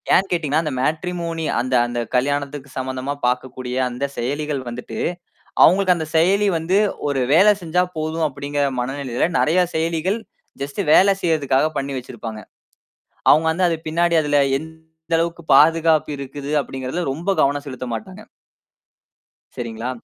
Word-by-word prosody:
ஏன் 195 Hz, -, +3 dB
கேட்டீங்கன்னா, 160 Hz, -3 st, +1 dB
அந்த 155 Hz, -, -2 dB
மேட்ரிமோனி 165 Hz, +3 st, -2 dB
அந்த 130 Hz, +2 st, -2 dB
அந்த 120 Hz, 0 st, -3 dB, 0.2 s
கல்யாணத்துக்கு 140 Hz, +1 st, -1 dB
சம்மந்தமா 130 Hz, +1 st, -3 dB
பாக்கக்கூடிய 125 Hz, 0 st, -2 dB
அந்த 125 Hz, +3 st, -3 dB
செயலிகள் 145 Hz, +3 st, -2 dB
வந்துட்டு 120 Hz, +1 st, -7 dB, 0.7 s
அவுங்களுக்கு 185 Hz, +1 st, +5 dB
அந்த 160 Hz, -2 st, -3 dB
செயலி 195 Hz, +5 st, +3 dB
வந்து, 165 Hz, +4 st, +1 dB, 0.3 s
"ஒரு 140 Hz, -2 st, 0 dB
வேலை 190 Hz, +8 st, +7 dB
செஞ்சா 175 Hz, +1 st, +1 dB
போதும்," 160 Hz, +1 st, -1 dB
அப்படிங்கிற 145 Hz, +1 st, -3 dB, 0.2 s
மனநிலையில 130 Hz, -1 st, -1 dB
நெறைய 175 Hz, +4 st, +3 dB
செயலிகள், 165 Hz, +5 st, 0 dB, 0.4 s
ஜஸ்ட் 140 Hz, +7 st, -5 dB
வேல 195 Hz, +4 st, +6 dB
செய்றதுக்காக 150 Hz, -4 st, +2 dB
பண்ணி 140 Hz, 0 st, -3 dB
வச்சிருப்பாங்க. 115 Hz, -3 st, -7 dB, 0.9 s
அவுங்க 160 Hz, +1 st, +5 dB
வந்து, 180 Hz, +3 st, +1 dB
"அது 165 Hz, -, 0 dB
பின்னாடி 170 Hz, +2 st, +2 dB
அதுல 145 Hz, -1 st, +2 dB, 0.2 s
எந்த 160 Hz, +1 st, -6 dB
அளவுக்கு 170 Hz, 0 st, -2 dB
பாதுகாப்பு 160 Hz, +1 st, +4 dB
இருக்குது?" 140 Hz, +1 st, -6 dB
அப்படிங்கிறதுல 135 Hz, +6 st, -4 dB
ரொம்ப 170 Hz, +7 st, -1 dB
கவனம் 140 Hz, +1 st, +1 dB
செலுத்த 130 Hz, -2 st, -6 dB
மாட்டாங்க. 195 Hz, -, -8 dB, 1.3 s
சரிங்களா? 115 Hz, 0 st, -5 dB
150 Hz, 130 wpm, -21 LUFS, 135-165 Hz, 1.3 s, வேலை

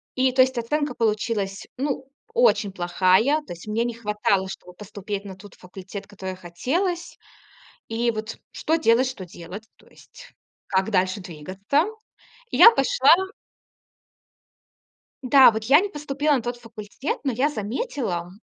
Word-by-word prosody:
и, 260 Hz, 0 st, +2 dB
то 260 Hz, -, +5 dB
есть, 260 Hz, 0 st, +2 dB
оценка 290 Hz, +4 st, -1 dB
получилась 210 Hz, -3 st, -1 dB
ну 270 Hz, 0 st, -3 dB, 0.2 s
очень 480 Hz, -, +3 dB
плохая. 185 Hz, -, +2 dB
То 235 Hz, -, -8 dB
есть 170 Hz, +4 st, -13 dB
мне 220 Hz, +2 st, 0 dB
не 240 Hz, 0 st, -2 dB
хватало, 210 Hz, -4 st, 0 dB
чтобы 180 Hz, -2 st, -10 dB
поступить 205 Hz, +1 st, -6 dB
на 195 Hz, -2 st, -8 dB
тот 200 Hz, 0 st, -14 dB
факультет, 190 Hz, +2 st, -10 dB
который 190 Hz, -2 st, -7 dB
хотелось. 310 Hz, -, -3 dB, 0.7 s
И 235 Hz, +1 st, 0 dB
вот 215 Hz, 0 st, -6 dB
что 320 Hz, -, 0 dB
делать 255 Hz, -4 st, +3 dB
что 195 Hz, -7 st, -6 dB
делать. 180 Hz, +5 st, -10 dB
То -, -, -24 dB
есть -, -, -17 dB, 0.3 s
как 190 Hz, +1 st, 0 dB
дальше 185 Hz, -1 st, +1 dB
двигаться. 190 Hz, -, -1 dB, 0.7 s
Я 460 Hz, -, +9 dB
пошла -, -, +4 dB, 2.1 s
Да, 260 Hz, 0 st, +7 dB
вот 220 Hz, -1 st, -4 dB
я 275 Hz, +7 st, +6 dB
не 410 Hz, -, -2 dB
поступила 295 Hz, -3 st, -1 dB
на 255 Hz, -, 0 dB
тот 240 Hz, +1 st, -4 dB
факультет. 230 Hz, +2 st, -6 dB
Но 270 Hz, -, 0 dB
я 255 Hz, +5 st, +1 dB
заметила, 215 Hz, -, -3 dB
220 Hz, 145 wpm, -24 LUFS, 195-270 Hz, 2.1 s, Я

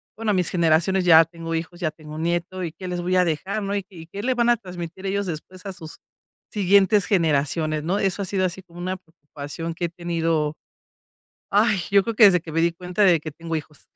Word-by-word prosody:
bueno, 220 Hz, -1 st, -1 dB
mis 180 Hz, -2 st, +1 dB
generaciones. 175 Hz, +2 st, +2 dB
Ya 165 Hz, -2 st, +8 dB
tengo 165 Hz, 0 st, -7 dB
hijos, 165 Hz, +1 st, -4 dB
ya 155 Hz, -3 st, 0 dB
tengo 155 Hz, 0 st, -11 dB
nieto 175 Hz, +3 st, -2 dB
y 165 Hz, -, -3 dB
qué 185 Hz, +3 st, -9 dB
les 180 Hz, -1 st, -3 dB
voy 180 Hz, +1 st, 0 dB
a 180 Hz, -, +4 dB
dejar, 185 Hz, +6 st, -2 dB
¿no? 200 Hz, 0 st, -2 dB
Y 200 Hz, -2 st, -3 dB
y 165 Hz, -4 st, -12 dB
qué 200 Hz, +4 st, -7 dB
le 255 Hz, +2 st, +1 dB
van 240 Hz, -1 st, +1 dB
a 240 Hz, -, +6 dB
transmitir 180 Hz, -2 st, -8 dB
ellos 200 Hz, +1 st, -1 dB
después 180 Hz, +3 st, -7 dB
a 195 Hz, -, -5 dB
sus 160 Hz, -3 st, -10 dB, 0.5 s
siguientes 200 Hz, 0 st, +4 dB
generaciones, 155 Hz, -3 st, +1 dB
¿no? 185 Hz, +6 st, 0 dB
Eso 195 Hz, 0 st, 0 dB
ha -, -, -3 dB
sido 190 Hz, 0 st, 0 dB
así 185 Hz, +1 st, -3 dB
como 175 Hz, -1 st, -14 dB
una 185 Hz, +1 st, -2 dB
preocupación 160 Hz, -1 st, -8 dB
que 175 Hz, -, -2 dB
he -, -, -2 dB
tenido. 165 Hz, -3 st, -1 dB, 1.0 s
¡Ay!, 210 Hz, 0 st, +3 dB
yo 200 Hz, -1 st, +6 dB
creo 230 Hz, -, -2 dB
que 220 Hz, -, +8 dB
desde 185 Hz, -4 st, +6 dB
que 160 Hz, -, -10 dB
me 165 Hz, -, +1 dB
di 170 Hz, +1 st, +3 dB
cuenta 180 Hz, +3 st, -2 dB
de 180 Hz, -4 st, +6 dB
que 155 Hz, -, -6 dB
tengo 165 Hz, +2 st, -6 dB
hijos. 150 Hz, -1 st, -9 dB
175 Hz, 230 wpm, -23 LUFS, 165-195 Hz, 1.0 s, Ya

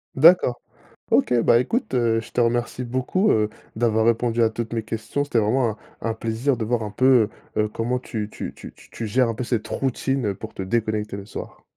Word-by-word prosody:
D'accord. 155 Hz, -4 st, +6 dB, 0.5 s
OK, -, -, +3 dB
bah 115 Hz, -, +5 dB
écoute, 225 Hz, -, -1 dB
heu, 115 Hz, -3 st, +2 dB
je 115 Hz, -, -10 dB
te 125 Hz, -, +1 dB
remercie 120 Hz, +1 st, 0 dB
beaucoup, 130 Hz, -, 0 dB
heu, 105 Hz, -1 st, +2 dB, 0.3 s
d'avoir 110 Hz, -1 st, +2 dB
répondu 115 Hz, 0 st, +2 dB
à 115 Hz, -, +4 dB
toutes 115 Hz, +1 st, -5 dB
mes 115 Hz, -, 0 dB
questions. 110 Hz, +6 st, -3 dB
C'était 145 Hz, -4 st, -1 dB
vraiment 115 Hz, +3 st, +2 dB
un 110 Hz, -, -10 dB, 0.2 s
un 115 Hz, -, -1 dB
plaisir 115 Hz, +4 st, -1 dB
de 110 Hz, -, -2 dB
voir 120 Hz, +1 st, 0 dB
un 105 Hz, -, -4 dB
peu, 125 Hz, -1 st, +4 dB, 0.3 s
heu -, -, +4 dB
heu, -, -, 0 dB
comment 120 Hz, +4 st, -1 dB
tu 110 Hz, -4 st, -4 dB
tu -, -, -5 dB
tu -, -, -10 dB
t -, -, -18 dB
tu 115 Hz, -, -5 dB
gères 125 Hz, +3 st, +2 dB
un 115 Hz, -, -2 dB
peu 125 Hz, -, -3 dB
cette 120 Hz, -3 st, -2 dB
routine, 135 Hz, -1 st, -1 dB
heu, 100 Hz, -, -1 dB
pour -, -, -9 dB
te 95 Hz, -, -4 dB
déconnecter 105 Hz, 0 st, -1 dB
le 100 Hz, 0 st, -7 dB
soir. -, -, -8 dB
115 Hz, 225 wpm, -23 LUFS, 110-125 Hz, 0.5 s, D'accord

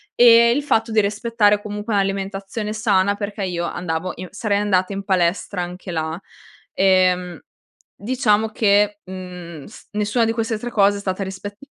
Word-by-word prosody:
ehm, 235 Hz, 0 st, +7 dB
il 290 Hz, -, -1 dB
fatto 225 Hz, -5 st, +1 dB
di 215 Hz, -, +5 dB
rispettare 210 Hz, 0 st, +1 dB
comunque 210 Hz, +1 st, -5 dB
un'alimentazione 195 Hz, +2 st, -2 dB
sana 200 Hz, -2 st, +2 dB
perché 205 Hz, 0 st, -5 dB
io 175 Hz, -2 st, -2 dB
andavo 175 Hz, +1 st, -3 dB
in 185 Hz, -, -8 dB
sarei 205 Hz, -1 st, -1 dB
andata 195 Hz, -2 st, +1 dB
in 195 Hz, 0 st, -4 dB
palestra 185 Hz, 0 st, 0 dB
anche 180 Hz, +1 st, -7 dB
là. 160 Hz, -1 st, -3 dB, 0.6 s
Ehm, 185 Hz, -2 st, +2 dB, 0.6 s
diciamo 220 Hz, -2 st, +1 dB
che, 205 Hz, -1 st, +2 dB
mhmm, 180 Hz, -5 st, -9 dB
s -, -, -14 dB
nessuna 210 Hz, +3 st, 0 dB
di 225 Hz, -, +1 dB
queste 225 Hz, -1 st, -2 dB
3 240 Hz, -, -5 dB
cose 205 Hz, -2 st, +3 dB
è -, -, -5 dB
stata 190 Hz, 0 st, -3 dB
rispet 195 Hz, +2 st, -7 dB
200 Hz, 160 wpm, -21 LUFS, 185-215 Hz, 0.6 s, ehm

